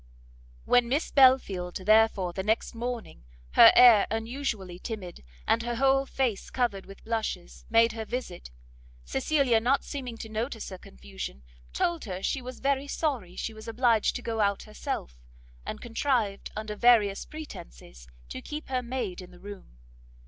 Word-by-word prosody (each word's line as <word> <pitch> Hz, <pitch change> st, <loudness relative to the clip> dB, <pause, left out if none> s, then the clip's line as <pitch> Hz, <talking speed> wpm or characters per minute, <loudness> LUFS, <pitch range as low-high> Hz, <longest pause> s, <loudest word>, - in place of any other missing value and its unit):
When 245 Hz, -1 st, +3 dB
Miss 285 Hz, +5 st, 0 dB
Belfield, 255 Hz, -10 st, +4 dB
therefore, 215 Hz, -4 st, +4 dB
the 190 Hz, -, -3 dB
next 215 Hz, +3 st, 0 dB
morning, 235 Hz, -, -5 dB, 0.3 s
her -, -, +9 dB
air 235 Hz, -5 st, +8 dB
unusually 225 Hz, -5 st, -4 dB
timid, 190 Hz, -, -7 dB, 0.2 s
and 230 Hz, -, +3 dB
her 240 Hz, 0 st, -3 dB
whole 270 Hz, +2 st, +2 dB
face 250 Hz, -8 st, -2 dB
covered 235 Hz, -7 st, -1 dB
with 195 Hz, -, -13 dB
blushes, 220 Hz, -6 st, -4 dB
made 230 Hz, +1 st, +5 dB
her 220 Hz, 0 st, -5 dB
visit, 230 Hz, -, -6 dB, 0.6 s
Cecilia, 250 Hz, -, +2 dB
not 255 Hz, +5 st, +1 dB
seeming 250 Hz, -5 st, -6 dB
to 225 Hz, -, -7 dB
notice 225 Hz, +2 st, -4 dB
her 185 Hz, -2 st, -9 dB
confusion, 65 Hz, -, -9 dB, 0.3 s
told 340 Hz, -5 st, -1 dB
her 190 Hz, -2 st, -6 dB
she 270 Hz, -, -1 dB
was 255 Hz, 0 st, -9 dB
very 275 Hz, 0 st, 0 dB
sorry 255 Hz, -, -2 dB
she 225 Hz, -, -4 dB
was 220 Hz, +1 st, -12 dB
obliged 230 Hz, -1 st, +2 dB
to 245 Hz, -, -5 dB
go 225 Hz, -1 st, -3 dB
out 200 Hz, -1 st, +1 dB
herself, 60 Hz, -, -6 dB, 0.5 s
and -, -, -5 dB
contrived, 230 Hz, -4 st, -1 dB
under 215 Hz, 0 st, -5 dB
various 210 Hz, -4 st, +4 dB
pretences, -, -, -11 dB, 0.2 s
to -, -, -6 dB
keep 300 Hz, -1 st, -7 dB
her 255 Hz, -1 st, 0 dB
maid 235 Hz, -7 st, -4 dB
in 180 Hz, -, -11 dB
the 180 Hz, -, -16 dB
room. 200 Hz, -, -11 dB
225 Hz, 155 wpm, -28 LUFS, 195-250 Hz, 0.6 s, her